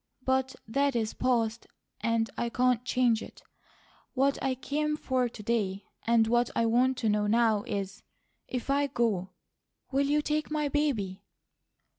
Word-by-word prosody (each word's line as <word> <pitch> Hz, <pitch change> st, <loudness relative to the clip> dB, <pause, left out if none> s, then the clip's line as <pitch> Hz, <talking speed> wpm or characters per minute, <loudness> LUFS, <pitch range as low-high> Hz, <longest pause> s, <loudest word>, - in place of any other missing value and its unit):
But 260 Hz, 0 st, +1 dB
that 275 Hz, +4 st, +1 dB
is 220 Hz, -2 st, 0 dB
past, 235 Hz, -3 st, 0 dB, 0.3 s
and 230 Hz, 0 st, +1 dB
I 235 Hz, -, -1 dB
can't 250 Hz, 0 st, +2 dB
change 245 Hz, -3 st, +2 dB
it. -, -, -11 dB, 0.7 s
What 275 Hz, +1 st, +2 dB
I 265 Hz, -1 st, 0 dB
came 300 Hz, +3 st, -1 dB
for 255 Hz, -4 st, 0 dB
to 215 Hz, -, -10 dB
day, 200 Hz, -3 st, -1 dB, 0.2 s
and 230 Hz, -1 st, +5 dB
what 240 Hz, +1 st, +2 dB
I 230 Hz, -, +2 dB
want 250 Hz, +3 st, +3 dB
to 230 Hz, -, -1 dB
know 210 Hz, 0 st, +1 dB
now 225 Hz, -1 st, +3 dB
is, 195 Hz, -1 st, -4 dB, 0.5 s
if 255 Hz, +2 st, -3 dB
I 285 Hz, +1 st, +2 dB
go, 220 Hz, -8 st, 0 dB, 0.6 s
will 275 Hz, +1 st, +2 dB
you 295 Hz, +1 st, +2 dB
take 305 Hz, 0 st, -1 dB
my 300 Hz, -1 st, 0 dB
baby?" 225 Hz, -11 st, -1 dB
240 Hz, 155 wpm, -29 LUFS, 225-270 Hz, 0.7 s, and